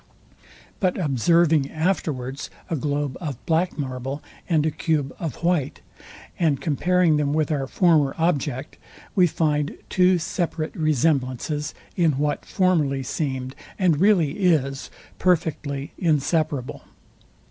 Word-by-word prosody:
But 185 -3 +1
observing 155 - +3
afterwards 150 -6 -2 0.2
a - - +2
globe 145 -1 -2
of 145 -7 -4
black 170 +3 +1
marble 135 0 -4 0.3
and 155 -3 +3
a 160 - +1
cube 150 -3 -1
of 160 -8 -3
white, 170 -6 0 0.6
and 155 -6 +2
comparing 175 +1 +2
them 145 -1 0
with 155 0 +1
our 140 -3 -1
former 155 -4 +3
object, 145 -6 -1 0.4
we 185 -4 +5
find 150 -2 0
two 180 0 +4
separate 165 -1 -3
resemblances, 150 -1 0 0.2
in 165 -4 +3
what 145 +1 -1
formerly 155 -8 +1
seemed, 130 -1 -3 0.2
and 175 -6 +2
really 190 -8 +4
is, 145 -8 +1 0.3
perfectly 155 -5 0
inseparable. 155 -4 0
155 Hz, 115 wpm, -23 LUFS, 140-170 Hz, 0.6 s, we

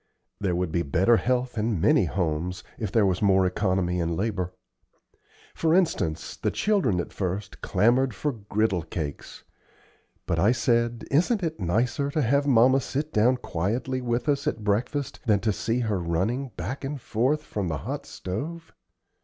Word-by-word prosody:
There 95 -3 0
would 90 -2 -1
be 85 - +1
better 85 +10 +3
health 125 -1 0
in 105 -3 0
many - - +4
homes 90 0 -2 0.2
if 110 -4 -3
there 110 -2 +4
was 95 -1 0
more 95 -2 +4
economy 90 -1 0
in 85 0 -1
labor. 95 -4 -1 1.0
For 165 0 +2
instance, 120 - 0
the - - -1
children 190 - +1
at 85 - -4
first 95 +1 -4
clamored 125 +4 +3
for 145 +8 -1
griddle 105 -4 -1
cakes, 80 -3 -6 0.8
but - - 0
I 105 +5 +4
said, 120 0 +1
"Isn't 180 - +2
it 160 -1 -2
nicer 115 - 0
to 150 +1 0
have 140 +4 +2
mamma 130 +1 +5
sit 150 +5 -3
down 120 +4 +4
quietly 120 +7 -2
with 120 +1 -1
us 140 -1 +1
at 110 - -2
breakfast 120 +8 -1
than 105 -3 +4
to 110 -3 +1
see 115 +5 -1
her 110 -5 0
running 95 +11 -1
back 115 +13 -4
and 140 +1 -4
forth 130 +7 0
from 105 -9 -3
the 80 -3 -2
hot - - -4
stove?" 160 - -6
110 Hz, 165 wpm, -26 LUFS, 95-130 Hz, 1.0 s, mamma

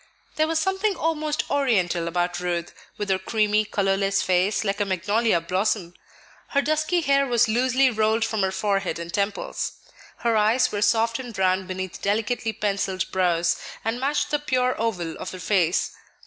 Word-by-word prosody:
There 310 0 +2
was 325 0 0
something 385 +5 0
almost 310 -2 -1
Oriental 190 -12 +1
about 175 +1 -1
Ruth, 175 -1 -3 0.2
with 205 -1 -4
her 190 - +2
creamy, 215 +1 +1
colorless 195 -1 +1
face, 185 +4 +1
like 200 0 -1
a - - +2
magnolia 205 +2 +1
blossom; 185 +1 -1 0.5
her 280 - +1
dusky 310 +4 +1
hair 275 -2 +2
was 240 -1 +3
loosely 255 +3 +3
rolled 220 0 +1
from 220 -2 -1
her 190 0 +1
forehead 195 -1 -1
and 170 +1 -7
temples; 200 0 -2 0.5
her 230 -1 +3
eyes 220 +4 +3
were 205 - -2
soft 230 +2 +2
and 245 -4 -7
brown 185 -1 +1
beneath 185 -1 -5
delicately 225 +3 0
pencilled 195 -3 -2
brows, 175 -2 +1 0.3
and 225 +2 -1
matched 290 +2 0
the 295 - +2
pure 255 -3 +1
oval 180 -8 -2
of - - -5
her 185 - -8
face. 180 -2 +1
210 Hz, 165 wpm, -24 LUFS, 185-250 Hz, 0.5 s, was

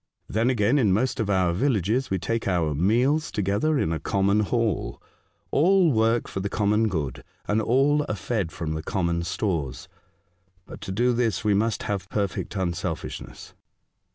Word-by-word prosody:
Then 115 +3 +1
again, 120 +3 +2
in 110 -7 +3
most 125 +6 0
of 110 -2 -1
our 95 -3 +2
villages 115 +2 0
we 95 - 0
take 115 +5 -2
our 85 -5 +1
meals 120 - +2
to 105 - -1
gether 105 +11 +1
in 80 -10 0
a 80 - -2
common 100 +6 +1
hall. 110 -1 -1 0.5
All 180 +2 +4
work 115 0 +2
for - - -5
the 100 +1 -2
common 105 +2 +2
good, 75 - -3 0.2
and 110 +2 +1
all 140 +6 +3
are 105 - -1
fed 100 -3 -2
from 80 -3 -4
the 80 - -3
common 85 0 -1
stores. 85 - -3 0.8
But - - -11
to - - -5
do 120 +5 +2
this 115 -4 0
we 105 -1 +3
must 110 +2 0
have 95 -2 -3
perfect 100 0 -2
unselfishness." 85 -3 -4
105 Hz, 170 wpm, -25 LUFS, 90-120 Hz, 0.8 s, All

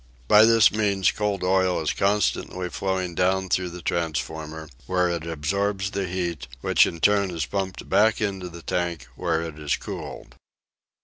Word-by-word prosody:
By 105 - +7
this 115 -1 +6
means 100 -4 +2
cold 105 -3 -2
oil 95 0 +2
is 80 - -1
constantly 95 -2 0
flowing 95 -2 -2
down 95 +2 +1
through 90 0 0
the 85 -1 -9
transformer, 80 -1 -3 0.2
where 90 -1 +1
it 85 -1 -3
absorbs 95 +5 -1
the 100 -2 -2
heat, 85 -6 -3
which - - +4
in 85 - -6
turn 100 +2 +3
is 85 -5 -2
pumped 95 +9 -4
back 110 +2 +3
into 95 -4 -2
the 85 -1 -11
tank, 85 -4 -2
where 85 -2 -1
it 80 -2 -7
is 75 -1 0
cooled. - - -8
90 Hz, 165 wpm, -24 LUFS, 85-100 Hz, 0.2 s, By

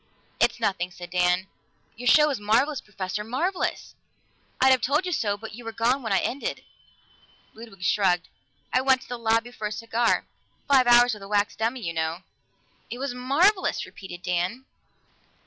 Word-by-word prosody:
"It's - - +2
nothing," 190 -5 -1
said 175 0 -11
Dan. 180 +1 +2 0.5
"Your 245 +2 -6
show 300 +4 +6
was 280 -7 -2
marvelous, 250 +7 +1
Professor 200 0 -5
marvelous! 330 - -2 0.7
I'd 265 0 +5
have 260 -2 +4
told 295 +9 +1
you 365 - -2
so, 205 -10 0
but 220 +1 -9
you 240 +3 -10
were 225 - -5
gone 235 +5 +1
when 225 -4 -4
it 195 - +3
ended." 270 +3 -4 0.9
Ludwig 220 -5 -12
shrugged. 180 -2 +2 0.5
"I 255 - +3
went 260 -1 +3
to - - -17
the 245 -1 -6
lobby 230 +1 +1
for 215 -3 -4
a - - -7
cigar. 230 +2 0 0.4
Five 265 -3 +5
hours 240 0 +6
with 210 - -8
a 195 - -9
wax 205 0 +1
dummy, 230 +3 -2
you 170 -5 -3
know!" 160 +2 -2 0.7
"It 240 - -5
was 270 -1 -3
marvelous!" 310 +11 +2
repeated 180 -2 -11
Dan. 180 +9 -2
230 Hz, 175 wpm, -25 LUFS, 195-255 Hz, 0.9 s, show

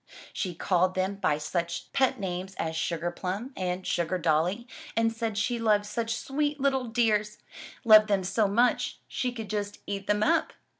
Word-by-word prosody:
She 180 -4 -3
called 185 +1 +1
them 190 +1 -1
by 170 -7 +1
such 170 +3 -3
pet 265 -2 +2
names 185 0 -4
as 160 0 -3
Sugar 170 +1 -1
Plum 195 +9 -4
and 180 0 -3
Sugar 170 +1 0
Dolly 175 +8 +1 0.3
and 225 0 +2
said 225 -2 -3
she 235 +2 0
loved 210 -2 +3
such 230 +2 -2
sweet 290 +3 -1
little 265 -2 +1
dears 215 -3 +1 0.2
— - - -15
loved 215 -1 +8
them 200 -2 +1
so 205 +3 +1
much 245 +4 +2
she 255 -2 -2
could 225 -3 -6
just 205 -1 -3
eat 200 -1 -4
them 210 0 +2
up! 330 +2 +2
205 Hz, 180 wpm, -28 LUFS, 185-235 Hz, 0.3 s, loved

